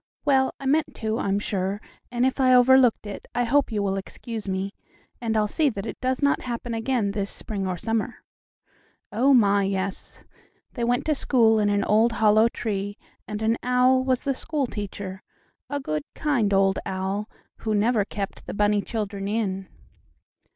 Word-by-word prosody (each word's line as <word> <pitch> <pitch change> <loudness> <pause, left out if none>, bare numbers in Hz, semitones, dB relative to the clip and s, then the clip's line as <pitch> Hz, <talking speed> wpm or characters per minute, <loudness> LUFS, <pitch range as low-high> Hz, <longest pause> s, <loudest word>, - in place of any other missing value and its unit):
Well, 265 -2 +3
I 275 - -8
meant 300 +4 +1
to, 220 0 -2
I'm 195 0 0
sure, 195 -1 -2 0.3
and 240 +1 +1
if 260 +1 0
I 255 -1 +5
overlooked 250 -2 +5
it 205 -1 -7
I 245 - +2
hope 270 +2 +2
you 210 -2 -1
will 195 -1 0
excuse 220 +2 -7
me, 190 +1 -2 0.5
and 225 -2 0
I'll 215 - +3
see 300 +7 +2
that 200 -5 -5
it - - -7
does 260 +2 -1
not 280 - +3
happen 240 -1 -4
again 225 -2 0
this 200 -1 -2
spring 195 -3 -3
or 180 -1 -2
summer. 225 +4 -2 0.9
Oh, 250 +6 +3
my, 205 -6 +5
yes; 195 0 -3 0.5
they 240 - -3
went 245 +1 +1
to 310 - +2
school 230 -6 +3
in 205 -1 +2
an 205 0 +1
old 225 +3 +3
hollow 220 0 +4
tree, 205 -3 -3 0.3
and 215 0 -4
an 225 +1 +1
owl 250 +1 +3
was 260 -1 0
the 275 - 0
school 285 +1 -2
teacher 200 -3 -6 0.5
a 285 - -2
good, 155 - -2
kind 255 -10 +1
old 195 -1 +3
owl, 190 +3 -3 0.3
who 220 -1 -1
never 215 +1 +2
kept 195 0 -6
the - - -5
bunny 205 0 +2
children 200 -3 -4
in. 195 -3 -2
220 Hz, 180 wpm, -25 LUFS, 200-250 Hz, 0.9 s, I